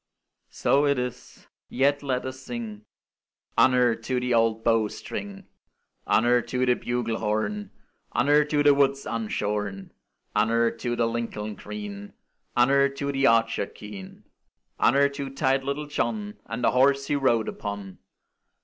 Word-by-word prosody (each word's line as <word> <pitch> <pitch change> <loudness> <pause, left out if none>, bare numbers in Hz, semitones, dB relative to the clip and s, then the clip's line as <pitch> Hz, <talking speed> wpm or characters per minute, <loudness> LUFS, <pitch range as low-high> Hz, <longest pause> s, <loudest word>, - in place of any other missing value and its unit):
So 145 +1 +2
it 140 -1 +2
is; 125 0 -6 0.2
yet 140 +2 +2
let 130 -3 -2
us 130 0 -6
sing 115 -5 -7 0.7
Honour 125 -1 +4
to 125 +3 -2
the 125 0 -1
old 115 -1 +2
bow 115 -2 +3
string! 195 - -7 0.6
Honour 120 +2 +4
to 125 +1 -1
the 125 - +4
bugle 120 -2 -2
horn! 105 -2 -2 0.5
Honour 145 +1 +4
to 150 0 +1
the 145 -1 +7
woods 140 0 +2
unshorn! 105 -3 -3 0.4
Honour 115 +2 +3
to 120 -1 -3
the 120 - +1
Lincoln 115 -2 -3
green! 100 0 -8 0.4
Honour 140 +3 +4
to 140 +1 -3
the 135 0 +2
archer 115 -4 +2
keen! 100 -3 -11 0.6
Honour 140 +3 +4
to 140 -1 -5
tight 135 0 +1
little 140 +2 -3
John, 110 -7 -3
And 115 +2 -5
the - - +4
horse 140 +2 +3
he 145 - 0
rode 120 -5 +2
upon! 100 -2 -6
120 Hz, 140 wpm, -26 LUFS, 110-135 Hz, 0.7 s, the